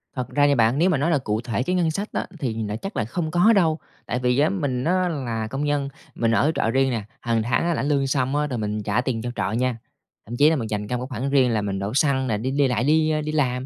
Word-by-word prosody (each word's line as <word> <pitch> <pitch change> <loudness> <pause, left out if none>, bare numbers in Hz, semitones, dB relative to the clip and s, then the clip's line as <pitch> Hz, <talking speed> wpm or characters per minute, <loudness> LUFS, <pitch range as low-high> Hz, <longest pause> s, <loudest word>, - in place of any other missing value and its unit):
Thật 125 -1 -3
ra 145 -1 +3
nha 140 - +3
bạn, 115 +3 +3
nếu 175 +4 +3
mà 175 - +2
nói 150 +5 +1
là 150 - +3
cụ 110 -5 -2
thể 120 0 -2
cái 180 +6 -1
ngân 170 -3 +1
sách 200 +7 -4
á, - - -2
thì 115 -5 -2
là 105 0 -3
chắc 195 - -6
là 110 - 0
không 155 +6 -3
có 195 +7 +5
đâu, 165 -5 +2 0.3
tại 125 - -2
vì 125 +1 +1
á, 150 - +4
mình 140 -10 -2
á, 185 +2 +1
là 120 -8 -3
công 135 +5 -3
nhân, 145 -1 0 0.3
mình 115 -1 +1
ở 140 +7 +3
trọ 115 - +1
riêng 135 +1 +2
nè, 115 -4 -2 0.2
hàng 115 -2 0
tháng 120 +2 +1
á, 175 - +1
lãnh 145 -2 -1
lương 140 -2 +1
xong 135 0 0
á 150 0 +1
rồi 130 -4 -3
mình 105 -1 -3
trả 105 +3 +1
tiền 125 -3 -2
cho 120 +1 -4
trọ - - -1
nha, 120 +1 0 0.5
thậm 120 +3 -6
chí 150 +2 +6
là 160 - +2
mình 115 -5 -3
dành 105 -1 -3
ra 125 - -2
một 125 - -4
cái 120 - -5
khoản 135 +3 -1
riêng 135 -3 +3
là 110 -2 +1
mình 100 -1 -3
đổ 100 +4 -3
xăng 135 -2 +2
nè, 105 -2 0
đi 130 +5 -2
đi 140 0 +2
lại 120 -1 0
đi, 155 +2 +3
ơ, 155 0 0
đi 155 +1 -3
làm, 130 -4 0
130 Hz, 310 wpm, -23 LUFS, 115-150 Hz, 0.5 s, chí